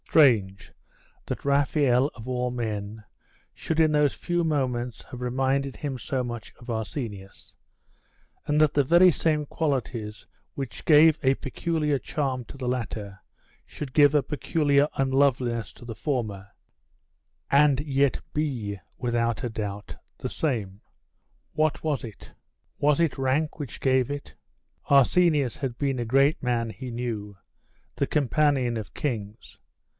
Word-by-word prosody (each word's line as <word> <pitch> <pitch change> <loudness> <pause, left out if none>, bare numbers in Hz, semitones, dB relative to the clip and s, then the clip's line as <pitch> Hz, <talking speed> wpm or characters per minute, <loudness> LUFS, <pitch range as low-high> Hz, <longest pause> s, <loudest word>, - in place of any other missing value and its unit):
Strange 110 -11 +3 0.5
that - - -5
Raphael, 140 -2 +3
of 115 0 -10
all 125 -1 -1
men, 110 -3 -4 0.5
should 160 0 -3
in 155 -1 +4
those 150 -2 +3
few 175 -1 -1
moments 125 -6 -1
have 125 - -10
reminded 135 +2 0
him 140 -3 -4
so 125 +4 -2
much 120 -2 -6
of 120 - -12
Arsenius; 110 -3 -5 0.9
and 150 +1 +1
that 155 -1 +4
the 145 - +3
very 175 +6 +6
same 155 -1 0
qualities 125 -9 -3 0.3
which 135 -4 -6
gave 155 0 +6
a 135 0 +4
peculiar 150 +1 -1
charm 130 -2 -2
to 140 - -12
the 130 -2 -4
latter 110 -5 -4 0.5
should 140 -4 -8
give 145 -1 +6
a 145 -2 +3
peculiar 145 -1 +1
unloveliness 130 -5 +1
to 120 - -14
the 115 -2 -6
former, 105 -9 -3 1.0
and 140 -1 +4
yet 140 -2 +1
be, 125 -10 -2 0.2
without 120 -2 -1
a - - -2
doubt, 105 -2 -5 0.2
the - - -4
same. 105 -10 -2 0.7
What 155 -1 0
was 150 -4 -1
it? 110 -4 -10 0.5
Was 145 +1 +3
it 165 -5 +1
rank 140 +4 0
which 140 -5 -6
gave 130 -2 +2
it 145 0 -6 0.6
Arsenius 140 -1 +4
had 130 -4 -4
been 135 -3 -1
a 120 - -1
great 135 +7 +3
man, 120 -2 0
he 130 +2 -8
knew 110 -4 -4 0.6
the - - 0
companion 140 -3 +1
of 110 -3 -6
kings. 110 -6 -5
130 Hz, 140 wpm, -26 LUFS, 115-145 Hz, 1.0 s, very